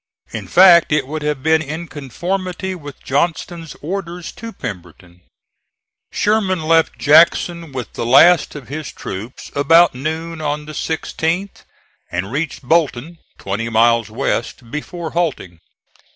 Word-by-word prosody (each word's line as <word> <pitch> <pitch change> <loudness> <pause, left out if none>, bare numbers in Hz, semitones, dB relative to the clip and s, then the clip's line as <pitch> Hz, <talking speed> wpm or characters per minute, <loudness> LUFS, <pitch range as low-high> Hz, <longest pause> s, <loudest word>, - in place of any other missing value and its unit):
In - - -6
fact 175 -3 +6
it 150 -3 +2
would 155 +3 -5
have 150 -3 -2
been 160 0 +3
in 160 +3 -5
conformity 180 +7 -4
with 145 -6 -10
Johnston's 165 +2 -2
orders 175 0 -5
to 230 0 -9
Pemberton. 90 - -9 0.9
Sherman 200 -5 +1
left 165 +1 +2
Jackson 165 +1 +4
with 130 -3 -6
the - - -4
last 145 +9 +5
of 140 -5 -9
his 150 +2 -6
troops 105 +7 -8
about 165 +5 +5
noon 160 +5 -4
on 150 0 -2
the 155 - -9
16th 165 +4 -3 0.5
and 95 +4 -3
reached 150 +1 -3
Bolton, 160 +1 0 0.2
twenty 105 +4 -3
miles 115 0 +3
west, 115 0 -3
before 165 +2 -5
halting. 150 - -2
155 Hz, 130 wpm, -18 LUFS, 130-170 Hz, 0.9 s, fact